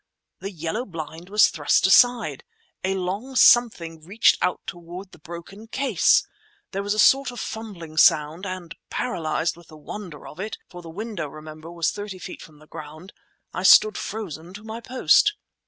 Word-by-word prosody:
The 195 - -5
yellow 170 +5 -4
blind 165 -3 -8
was 210 +1 +5
thrust 150 +1 +2
aside. 245 +5 +4 0.4
A 190 +1 0
long 195 +8 -4
something 170 -11 +4
reached 200 +7 +3
out 180 - 0
toward 175 +2 -9
the - - -16
broken 170 +6 -10
case. 250 -6 +3 0.5
There 195 - -2
was 205 +1 -1
a - - -6
sort 270 +5 +5
of 245 -1 -8
fumbling 190 -10 -7
sound, 155 +3 +4
and 185 -3 -6 0.2
paralyzed 165 -8 -2
with 170 -1 -17
the 155 - -14
wonder 160 0 -9
of 150 - -12
it—for 190 -3 -7
the 165 - -11
window, 200 -2 -5
remember, 155 +2 -10
was 170 -1 0
thirty 205 -2 -7
feet 180 - -9
from 155 -2 -14
the 155 - -18
ground—I 155 +5 -11
stood 210 +2 +7
frozen 180 -4 -6
to 205 - -10
my 220 +1 -7
post. 260 - +3
185 Hz, 165 wpm, -24 LUFS, 165-215 Hz, 0.5 s, stood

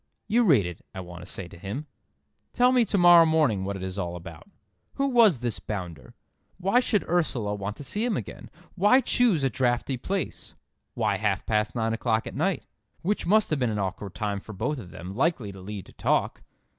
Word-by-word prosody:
"You 240 +3 +3
read 135 - +5
it," 90 -1 -7
I - - -5
want 90 -1 -9
to 90 - -9
say 95 - -6
to 85 - -14
him. 105 - -5 0.7
"Tell 250 0 +4
me 250 -2 +4
to 205 - 0
morrow 175 -2 +8
morning 155 -12 +2
what 100 +1 -3
it 95 - -6
is 95 +1 -4
all 90 -2 -3
about. 90 - -10 0.5
Who 275 - +1
was 220 - +5
this 120 -2 -1
bounder? 85 - -7 0.4
Why 195 +6 +3
should 220 -5 0
Ursula 135 -12 0
want 105 +1 -4
to - - -8
see 205 - -2
him 240 -2 0
again? - - -8 0.2
Why 205 +7 +5
choose 230 - +2
a 135 - +3
draughty 125 +1 0
place? 190 +9 -4 0.4
Why 105 -4 +1
half 105 -2 -1
past 105 +1 0
nine 115 -1 0
o'clock 115 -1 0
at - - -6
night, - - -1 0.4
which 205 +2 -1
must 215 +1 +3
have 155 - +1
been 125 -2 +1
an 105 - -2
awkward 95 0 -4
time 105 -2 -2
for 110 - -10
both 145 +9 -2
of 95 -7 -10
them—likely 105 - -2
to 95 -1 -11
lead 100 0 -7
to - - -16
talk? - - 0
115 Hz, 205 wpm, -26 LUFS, -, 0.7 s, morrow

